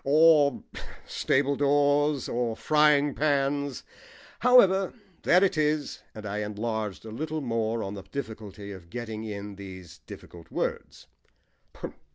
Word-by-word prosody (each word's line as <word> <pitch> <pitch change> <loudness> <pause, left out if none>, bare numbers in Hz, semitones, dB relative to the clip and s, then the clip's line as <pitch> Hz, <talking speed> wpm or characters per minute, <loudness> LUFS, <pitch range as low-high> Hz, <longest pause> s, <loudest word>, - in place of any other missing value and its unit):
Or 150 0 +5 0.4
stable 140 +1 +1
doors, 145 0 +2
or 120 -1 -1
frying 150 -2 +3
pans. 140 -2 0 0.6
However, 195 -6 +5 0.3
there 180 +2 +5
it 190 -5 +2
is." 150 -1 0
And 110 -1 -8
I 105 +1 -3
enlarged 105 0 -3
a 110 - -8
little 155 +6 -3
more 115 -3 -1
on 100 - -5
the 100 - -7
difficulty 105 -5 -7
of 90 -4 -11
getting 110 0 -5
in 100 -1 -6
these 95 -4 -10
difficult 85 -1 -12
words. - - -4
130 Hz, 125 wpm, -27 LUFS, 105-150 Hz, 0.6 s, Or